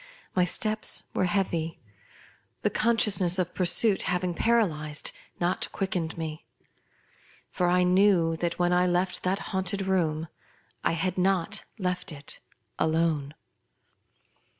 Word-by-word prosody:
My 180 -1 +4
steps 215 +4 +1
were - - +1
heavy, 175 -4 -1 0.8
the - - +2
consciousness 210 -6 +2
of 180 -1 -1
pursuit 190 +3 +2
having 180 0 0
paralyzed 165 -9 +1 0.3
not 175 +1 0
quickened 180 -5 -2
me; 160 -1 -6 1.0
for 180 - 0
I 180 +1 +3
knew 180 -3 +4
that 170 0 -2
when 175 0 +2
I 180 0 +3
left 180 0 0
that 185 +1 0 0.2
haunted 190 +1 -1
room 165 -4 0 0.6
I - - +2
had 180 +3 -1
not 195 +2 +1
left 180 -2 -2
it 145 -2 -8 0.4
alone. 160 -3 0
180 Hz, 120 wpm, -27 LUFS, 165-190 Hz, 1.0 s, My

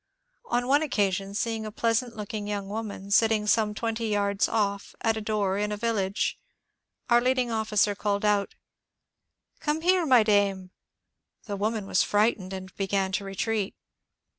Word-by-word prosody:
On 245 +1 0
one 285 +3 +4
occasion, 200 - 0
seeing 225 0 -1
a 215 - -5
pleasant 230 +2 0
looking 210 0 -5
young 205 -1 -3
woman 205 -2 -5
sitting 220 0 +3
some 210 0 +2
twenty 225 0 -2
yards 200 -1 +1
off 200 -2 -1
at 225 -1 +2
a 220 - -3
door 205 -2 0
in 210 0 -1
a 210 - -2
village, 205 -3 -1 0.7
our 240 -1 +5
leading 255 -1 +1
officer 215 -2 +1
called 200 0 -1
out: 205 -1 +1 0.4
— - - -58
" - - -57
Come 300 +1 -1
here, 360 -1 +3
my 250 -4 +6
dame! 200 -3 +1 0.4
" - - -56
The 205 - -4
woman 215 +1 -1
was 185 - +2
frightened 205 -3 +1
and 190 0 -7
began 195 -1 0
to 200 +1 -1
retreat. 200 +1 -2
210 Hz, 165 wpm, -27 LUFS, 200-225 Hz, 0.7 s, my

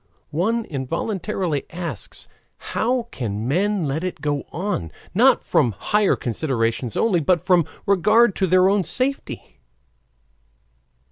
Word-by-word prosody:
One 220 +9 0
involuntarily 165 - -3
asks 170 - -6 0.3
how 245 +1 -1
can 110 -2 -4
men 190 +5 +1
let 145 +4 -2
it 185 - -4
go 145 -2 -2
on, 165 - -3 0.2
not - - +4
from 120 - +2
higher 210 - +1
considerations 115 -2 -1
only, 210 -6 +2
but 170 +3 +2
from 180 -4 +4 0.2
regard 210 +3 +4
to 190 - +1
their 185 +1 +5
own 200 +1 +3
safety? 255 - -3
175 Hz, 120 wpm, -22 LUFS, 140-205 Hz, 0.3 s, their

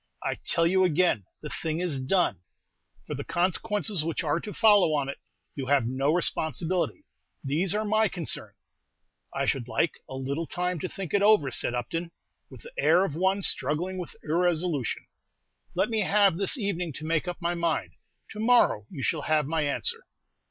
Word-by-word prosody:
I - - -2
tell 165 - +2
you 185 +2 +3
again, 175 - +2 0.2
the 150 - -5
thing 160 +1 -3
is 170 -6 -1
done. 130 - +1 0.6
For - - -5
the - - -4
consequences 195 +1 0
which 165 +1 -2
are 150 +1 +1
to 210 - -7
follow 205 -8 +5
on 140 -2 -1
it 140 - -6 0.3
you 135 -2 -5
have 140 -3 +3
no 135 +4 0
responsibility; 175 - 0 0.4
these 165 +8 0
are 215 +1 0
my 215 +1 +3
concern." 175 -5 -4 0.8
"I - - -1
should 125 -3 -1
like 155 +4 0
a 130 - -6
little 140 +5 -3
time 180 -1 -2
to 185 - -3
think 190 -5 -6
over 200 -7 +4
it," - - -6
said 120 - 0
Upton, 165 +8 -3 0.4
with - - -13
the 480 - -11
air 190 - +4
of 160 - -4
one 190 +3 +1
struggling 175 +8 0
with 175 - -7
irresolution. 165 -4 0 0.7
"Let - - +1
me 220 - +1
have 200 -2 +4
this 200 +7 +2
evening 180 - -2
to 155 +5 -7
make 165 +1 0
up 175 0 -4
my 170 -1 0
mind; 170 -2 -1 0.4
to 210 - -8
morrow 225 - +3
you 140 -7 -6
shall 160 - 0
have 155 0 +2
my 160 +2 0
answer." 460 - -1
170 Hz, 180 wpm, -27 LUFS, 150-195 Hz, 0.8 s, follow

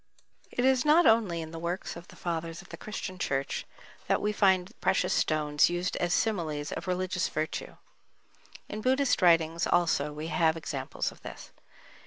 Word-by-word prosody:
It 245 - -1
is 260 -2 +4
not 310 +4 +5
only 205 -7 +3
in 160 - -9
the 165 - -6
works 175 +3 -3
of 170 +1 -10
the - - -15
Fathers 165 0 -4
of - - -19
the - - -7
Christian 185 -3 -6
Church 135 -3 -2 0.4
that - - +2
we 210 - 0
find 190 -2 +3
precious - - +2
stones 150 -2 +2
used 175 +1 -2
as 175 0 0
similes 160 -8 0
of - - -5
religious 185 0 -1
virtue, 155 +1 -4 0.9
in 215 - -5
Buddhist 260 +1 +2
writings 165 -1 +4
also 155 -4 +2
we 155 +2 -6
have 165 -2 +2
examples 140 -4 -3
of - - -17
this. - - -10
175 Hz, 170 wpm, -29 LUFS, 160-195 Hz, 0.9 s, not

